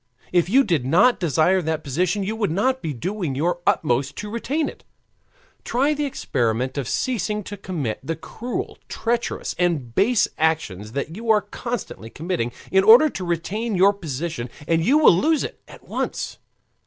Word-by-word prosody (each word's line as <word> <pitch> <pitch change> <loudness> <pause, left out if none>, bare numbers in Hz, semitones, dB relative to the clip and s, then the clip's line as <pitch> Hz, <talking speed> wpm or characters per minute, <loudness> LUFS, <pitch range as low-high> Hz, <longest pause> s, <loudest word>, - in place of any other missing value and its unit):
If 175 -1 +3
you 265 +6 +5
did 170 - +1
not 180 - +4
desire 175 +2 +2
that 160 -1 -2
position, 180 +8 0
you 215 +3 -2
would 220 -4 0
not 255 +10 +1
be 155 - -3
doing 170 - -3
your 175 +5 0
utmost 135 -1 +1
to 210 0 -6
retain 280 +7 -1
it. - - -9 0.8
Try 275 +5 +1
the 295 0 -1
experiment 125 - -1
of 140 -6 -3
ceasing 210 -4 -1
to 205 - -7
commit 170 - -4
the 160 +5 -3
cruel, 235 +10 -6
treacherous, 235 +1 -2
and 155 -10 0
base 215 - +3
actions 110 - -1
that 140 +4 -3
you 225 +2 -6
are 215 -1 +5
constantly 205 - -6
committing 155 -5 -3 0.2
in 190 0 +4
order 235 +9 +8
to 185 - -5
retain 195 +6 -2
your 195 +2 +5
position, 155 -7 -4 0.2
and 165 -1 +2
you 270 - +4
will 305 - +7
lose 310 - +2
it - - -7
at - - -15
once. - - -3
180 Hz, 170 wpm, -23 LUFS, 150-220 Hz, 0.8 s, order